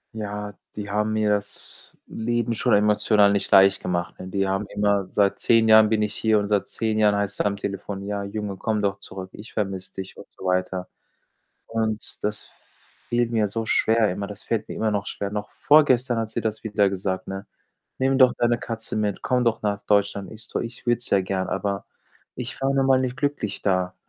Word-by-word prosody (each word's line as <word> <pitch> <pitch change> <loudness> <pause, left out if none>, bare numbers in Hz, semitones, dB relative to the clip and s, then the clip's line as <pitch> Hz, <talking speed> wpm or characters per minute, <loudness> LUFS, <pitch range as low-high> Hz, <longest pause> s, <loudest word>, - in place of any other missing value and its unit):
Ja, 105 -1 -5 0.2
die 105 -1 -5
haben 105 +1 0
mir 110 -1 +1
das 105 0 -3
Leben 120 +1 -1
schon 120 +1 +1
emotional 105 0 +4
nicht 100 - 0
leicht 95 0 +6
gemacht, 85 -1 -3
ne, 95 - -7
die 95 +1 0
haben 95 +2 -1
immer 100 -1 +1
seit 100 +1 +1
10 115 -1 +4
Jahren 110 0 +8
bin 110 0 +1
ich 105 0 -1
hier 110 -1 +2
und 100 0 -1
seit 105 -2 +1
10 110 -1 -1
Jahren 105 -1 +4
heißt‘s 100 0 -1
am 100 0 +1
Telefon: 100 0 -5
„Ja, 100 0 -2
Junge, 100 -1 -4
komm 105 +1 -1
doch 100 -1 0
zurück. 95 0 -8
Ich 105 +3 -12
vermisse 95 -3 -3
dich,“ 95 0 -7
und - - -10
so - - -15
weiter 90 0 -1 0.8
und 110 -1 -3
das 105 0 -3 0.6
fiel 120 0 +2
mir 110 -2 +2
so 110 +2 -3
schwer 110 -1 +3
immer, 100 +2 -4
das 105 0 -10
fällt 110 -2 -2
mir - - -5
immer 110 -1 0
noch 100 -1 -2
schwer. 100 0 -4
Noch 105 0 -4
vorgestern 130 -5 +4
hat 110 -1 -2
sie - - -2
das 110 0 -3
wieder 105 -2 +2
gesagt, 95 -1 -2
ne: 95 0 -6 0.5
„Nimm 135 +1 +2
doch 130 -1 +7
deine 120 0 +2
Katze 115 -1 -5
mit, 105 -2 -1
komm 125 -1 +1
doch 115 -2 0
nach 100 -1 -1
Deutschland.“ 100 -2 +1
Ich 110 0 -11
so: - - -3
„Ich 115 +1 -7
würde 120 0 +3
es 120 - -7
ja 100 - +4
gern, 95 0 -2
aber 100 -1 -2 0.5
ich 125 +1 -6
war 135 0 +2
nun 135 -1 +2
mal 130 -1 +4
nicht 130 -1 -2
glücklich 140 -8 -2
da.“ 90 -2 +1
105 Hz, 210 wpm, -24 LUFS, 100-115 Hz, 0.8 s, Jahren